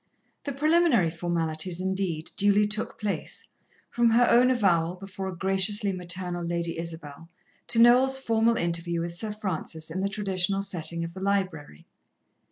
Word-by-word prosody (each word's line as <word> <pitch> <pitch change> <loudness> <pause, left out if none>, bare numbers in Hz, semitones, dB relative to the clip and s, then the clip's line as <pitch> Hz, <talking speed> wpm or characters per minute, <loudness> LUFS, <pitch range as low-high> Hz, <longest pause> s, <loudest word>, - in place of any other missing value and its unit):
The 285 - -2
preliminary 295 - +3
formalities, 165 0 -2
indeed, 185 -4 -2
duly 205 +1 +3
took 210 +1 -3
place, 210 -2 -4 0.4
from 240 -1 +3
her 235 +2 +4
own 245 +2 +5
avowal 180 -8 +2
before 195 0 -7
a 185 - -5
graciously 195 +3 +2
maternal 180 -1 -3
Lady 170 -1 -3
Isabel, 165 -1 -8 0.4
to 235 - -1
Noel's 250 +3 +6
formal 230 -2 +1
interview 170 -1 -1
with 170 0 -4
Sir 210 +5 -5
Francis 165 -6 -3
in 185 +3 -3
the 200 - 0
traditional 195 -1 -1
setting 170 -3 -2
of 165 0 -6
the 190 - -9
library. 185 - -2
190 Hz, 150 wpm, -26 LUFS, 170-210 Hz, 0.4 s, Noel's